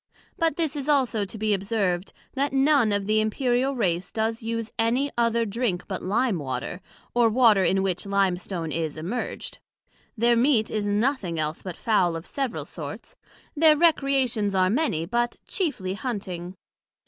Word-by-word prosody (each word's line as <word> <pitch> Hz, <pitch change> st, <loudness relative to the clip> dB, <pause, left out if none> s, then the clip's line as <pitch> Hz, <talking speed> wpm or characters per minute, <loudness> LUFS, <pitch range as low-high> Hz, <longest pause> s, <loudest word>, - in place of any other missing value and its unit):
But 330 Hz, -3 st, +1 dB
this 320 Hz, -3 st, -1 dB
is 285 Hz, 0 st, -4 dB
also 250 Hz, -7 st, +2 dB
to 200 Hz, -, -9 dB
be 215 Hz, 0 st, +1 dB
observed, 195 Hz, -2 st, -1 dB, 0.2 s
that 275 Hz, +1 st, -1 dB
none 270 Hz, -4 st, +4 dB
of 200 Hz, -1 st, 0 dB
the 215 Hz, +1 st, +2 dB
Imperial 250 Hz, +4 st, 0 dB
race 180 Hz, -6 st, -1 dB
does 225 Hz, +1 st, -1 dB
use 230 Hz, 0 st, -3 dB
any 250 Hz, +5 st, +1 dB
other 235 Hz, -1 st, +2 dB
drink 205 Hz, -4 st, -2 dB
but 190 Hz, -3 st, -4 dB
Lime 215 Hz, 0 st, 0 dB
water, 130 Hz, +6 st, -4 dB, 0.3 s
or 240 Hz, -1 st, +4 dB
water 220 Hz, -4 st, +5 dB
in 190 Hz, +1 st, +2 dB
which 190 Hz, 0 st, -2 dB
Lime 195 Hz, -2 st, +2 dB
stone 175 Hz, -3 st, -5 dB
is 160 Hz, -1 st, -3 dB
immerged; 185 Hz, +11 st, -5 dB, 0.6 s
their 235 Hz, +2 st, +4 dB
meat 235 Hz, -2 st, +3 dB
is 210 Hz, -1 st, -1 dB
nothing 205 Hz, -, 0 dB
else 155 Hz, +1 st, -2 dB
but 185 Hz, -2 st, -6 dB
Fowl 190 Hz, -7 st, +2 dB
of 165 Hz, +1 st, -6 dB
several 270 Hz, -4 st, -3 dB
sorts, -, -, -8 dB, 0.4 s
their 310 Hz, 0 st, +6 dB
recreations 270 Hz, -, +2 dB
are 185 Hz, 0 st, +3 dB
many, 225 Hz, -, 0 dB
but 240 Hz, +5 st, -1 dB
chiefly 290 Hz, -, -1 dB
Hunting. 190 Hz, -6 st, -5 dB
220 Hz, 160 wpm, -25 LUFS, 190-255 Hz, 0.6 s, their